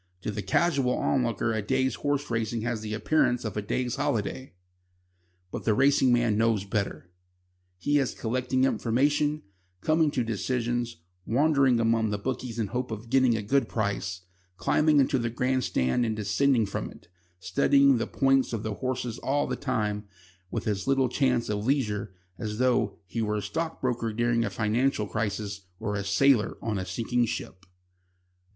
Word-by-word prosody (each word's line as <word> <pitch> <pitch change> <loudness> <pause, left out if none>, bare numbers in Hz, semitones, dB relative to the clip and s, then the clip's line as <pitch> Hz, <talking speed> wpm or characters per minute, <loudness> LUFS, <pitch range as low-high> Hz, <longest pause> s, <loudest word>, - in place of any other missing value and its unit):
To 105 - -3
the 105 0 -4
casual 140 -3 +1
onlooker 120 -3 0
a 110 - -1
day's 130 +3 0
horse 145 -1 -2
racing 115 0 -1
has 115 -1 -2
the 110 0 -4
appearance 125 -1 +1
of 110 - -4
a 105 - -1
day's 125 +4 -2
holiday. 130 -4 -2 1.0
But - - -5
the 110 - +2
racing 135 0 +4
man 120 -3 +2
knows 115 -3 +2
better. 95 -4 -3 0.7
He 145 +10 +2
is 135 - -1
collecting 130 +2 -1
information, 145 +4 +1 0.4
coming 155 - +3
to 130 -4 -1
decisions, 120 +1 -2 0.3
wandering 135 -1 +3
among 115 -1 +2
the 105 - -1
bookies 120 +1 -4
in 115 - 0
the 100 - -10
hope 125 +1 -2
of 110 +1 -7
getting 130 -3 +4
a 105 - -4
good 135 +7 +1
price, 100 -4 -2 0.4
climbing 150 - +3
into 135 0 +2
the 115 -1 -1
grand 125 +2 0
stand 65 - +1
and 110 -2 -1
descending 110 +3 +2
from 100 - -4
it, - - -16 0.3
studying 140 +5 +3
the 115 - -2
points 135 -2 +2
of 110 -2 -3
the 110 - -2
horses 125 0 -3
all 145 +2 0
the - - -2
time 105 -6 -2 0.4
with 115 - -4
as 100 0 -1
little 135 -2 +3
chance 125 -2 +1
of 105 -1 -2
leisure 110 -6 0 0.3
as 105 -1 -4
though 120 -5 +1
he 115 +6 -4
were 105 -1 0
a - - -2
stockbroker 125 -2 -2
during 120 +1 +1
a 110 - -1
financial 110 +3 0
crisis 100 -2 -3
or 110 -2 -3
a 100 0 -2
sailor 110 +3 +3
on 110 -4 -2
a 95 - -5
sinking 120 +1 0
ship. 95 -3 -6
120 Hz, 170 wpm, -27 LUFS, 105-130 Hz, 1.0 s, racing